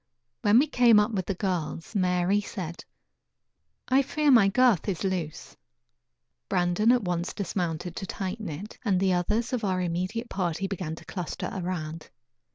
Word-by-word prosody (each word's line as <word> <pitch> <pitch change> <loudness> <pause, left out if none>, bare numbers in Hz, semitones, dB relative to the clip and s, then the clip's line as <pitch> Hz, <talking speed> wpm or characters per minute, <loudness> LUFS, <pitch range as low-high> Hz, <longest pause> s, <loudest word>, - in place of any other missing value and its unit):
When 205 +2 +5
we 275 - +6
came 245 -7 +5
up 210 +2 +2
with 190 -4 -2
the 195 - -1
girls, 175 -3 -3
Mary 185 0 +2
said: 180 -5 -6 1.0
"I 265 +2 +4
fear 295 +2 +1
my 225 -6 +7
girth 225 -2 +3
is 185 -1 -2
loose." 180 -5 -3 0.9
Brandon 180 +4 +3
at 245 -3 +3
once 175 -1 -2
dismounted 175 -3 -3
to 195 - -4
tighten 195 +2 -4
it, 185 +9 -8
and 195 -5 +2
the 190 -1 +2
others 210 +8 0
of 240 -3 -1
our 185 -2 0
immediate 185 +7 -2
party 180 -1 -1
began 180 -5 -4
to - - -13
cluster 180 -4 -5
around. 165 -4 -4
190 Hz, 160 wpm, -27 LUFS, 175-215 Hz, 1.0 s, my